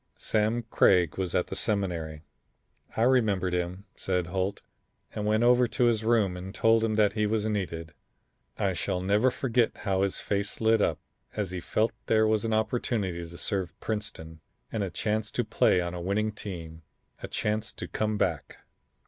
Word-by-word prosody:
Sam 110 +2 0
Craig 90 -6 +3
was 90 -2 -2
at 90 - +2
the - - -6
Seminary. 85 -7 -2 0.7
I 110 - +3
remembered 105 -8 +2
him," 90 +2 -2
said 90 -2 -1
Holt, 95 +3 -2 0.5
"and 105 0 -2
went 110 +2 +3
over 125 0 +5
to 125 - 0
his 115 -2 +3
room 110 -5 +2
and 95 +2 -7
told 115 0 +4
him 110 -1 +1
that 105 -2 +3
he 105 -1 +1
was 110 0 0
needed. 85 -6 -3 0.6
I 95 -1 +1
shall 90 +2 -2
never 100 +7 +3
forget 120 -2 0
how 95 -2 0
his 100 -1 +1
face 100 0 -2
lit 110 -1 +3
up - - +2 0.4
as 105 -4 -2
he 90 - -3
felt 110 +6 0 0.2
there 110 0 +4
was 110 -1 +2
an 115 - -1
opportunity 110 -6 -1
to 85 - -11
serve 95 -3 -2
Princeton 80 -7 -5 0.3
and 110 - -2
a 100 - -1
chance 105 +4 -1
to - - +1
play 90 - +3
on 85 0 -3
a 90 - -5
winning 105 +4 0
team; 85 -6 -7 0.4
a - - -5
chance 105 0 -1
to - - -6
come 110 -1 -1
back. 85 -8 -1
100 Hz, 180 wpm, -28 LUFS, 90-110 Hz, 0.7 s, over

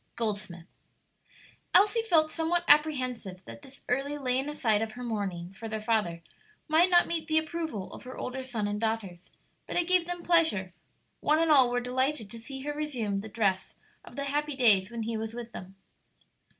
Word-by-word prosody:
Goldsmith. 205 -7 -3 1.1
Elsie 415 +5 +5
felt 320 -8 +3
somewhat 340 +1 0
apprehensive 255 -11 +2
that 115 0 -10
this 270 - -14
early 275 +3 -1
laying 265 0 -1
aside 225 -8 +1
of 220 -1 -3
her 245 - -8
mourning 195 -6 -4
for 225 +3 -8
their 220 0 -3
father 210 -7 -1 0.4
might 330 +3 +4
not 350 -1 +5
meet 325 -2 -3
the 315 -1 +2
approval 315 - -3
of - - -9
her 255 - -8
older 260 +1 -4
son 235 -5 -3
and 205 +1 -3
daughters; 200 -6 -3 0.4
but - - -5
it 350 -1 +1
gave 360 -2 +3
them 350 -1 -4
pleasure; 315 - +2 0.5
one 305 +1 +2
and 325 0 +2
all 265 -4 +7
were 245 0 0
delighted 255 -2 -1
to 230 - -8
see 265 +4 -8
her 295 +2 -3
resume 250 -10 -2
the 220 +2 -7
dress 195 -3 -1 0.3
of - - -14
the 280 - -3
happy 295 +1 -1
days 210 -7 +4
when 235 -1 -4
he 225 +1 -3
was 220 +1 -5
with 240 -1 -7
them. 190 -2 -10
250 Hz, 190 wpm, -29 LUFS, 210-305 Hz, 1.1 s, all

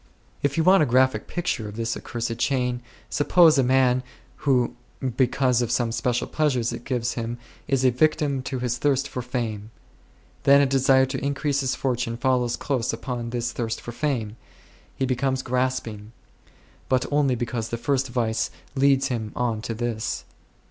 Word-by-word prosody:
If 140 +1 0
you 165 - +3
want 185 +2 +6
a 150 - +3
graphic 130 +2 +2
picture 175 -11 -2
of 105 - -10
this 115 0 -2
accursed 115 -1 -4
chain, 125 -2 0 0.3
suppose 160 +2 +5
a - - +4
man 130 0 +3 0.5
who 125 -3 +3 0.4
because 125 -1 +2
of 120 - -1
some 120 -1 +1
special 120 +1 0
pleasure 150 -5 +1
it 120 +1 -3
gives 120 -3 -1
him 115 0 -4 0.3
is 135 -2 +1
a 130 - +5
victim 140 +1 +1
to 130 +1 -4
his 125 -1 -2
thirst 140 -1 +1
for 125 - -5
fame; 115 -4 -4 0.7
then 140 0 +6
a 140 - +5
desire 135 0 +4
to 130 - -4
increase 140 0 0
his 130 -2 0
fortune 120 -3 -1
follows 125 -1 +1
close 130 -5 -1
upon 120 0 -4
this 120 0 -2
thirst 115 -2 -3
for 120 - -7
fame; 120 -4 -2 0.6
he 135 - 0
becomes 130 +1 0
grasping; 120 -4 -2 0.8
but 130 -1 +2
only 145 -3 +2
because 115 -1 -3
the 115 - -3
first 135 +2 0
vice 115 -2 -1 0.2
leads 135 0 +3
him 110 -4 -3
on 115 -3 -1
to 115 +1 -4
this. 115 -1 -3
125 Hz, 170 wpm, -24 LUFS, 120-135 Hz, 0.8 s, want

